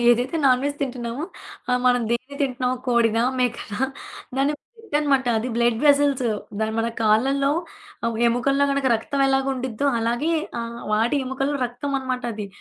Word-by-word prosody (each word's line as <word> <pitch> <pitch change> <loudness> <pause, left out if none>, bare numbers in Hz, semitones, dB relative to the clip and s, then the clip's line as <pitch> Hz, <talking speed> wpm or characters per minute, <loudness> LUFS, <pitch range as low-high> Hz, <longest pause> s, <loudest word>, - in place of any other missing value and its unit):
ఏదైతే 245 +6 +3
నాన్‌వెజ్ 270 +3 +2
తింటున్నామో 250 +1 -3 0.5
ఆహ్, 250 - +2
మనం 245 -1 +4
దేన్ని 255 +4 -2
తింటున్నామో 255 -1 0
కోడిదా, 230 -1 +3 0.2
మేకనా? 235 -4 -2 0.6
దాన్ని 275 +2 +2 0.2
బ్లడ్డన్నమాట. 295 - 0
అది 235 +4 -3
బ్లడ్ 235 -1 +2
వెసల్స్. 285 -3 +4 0.4
దా 220 - +2
మన 225 - +1
కాళ్ళల్లో 270 +6 +3 0.8
ఎముకల్లో 275 +4 +2
గనక 275 -1 0
రక్తం 275 +5 -2
ఎలాగు 270 0 +2
ఉండిద్దో 255 +1 -2
అలాగే 240 +8 0 0.3
ఆహ్, 235 0 -6
వాటి 230 +6 +2
ఎముకల్లో 270 +2 -1
రక్తం 245 +4 -5
అనమాట 255 -1 -3
అది. 210 -1 -5
255 Hz, 140 wpm, -23 LUFS, 235-275 Hz, 0.8 s, మనం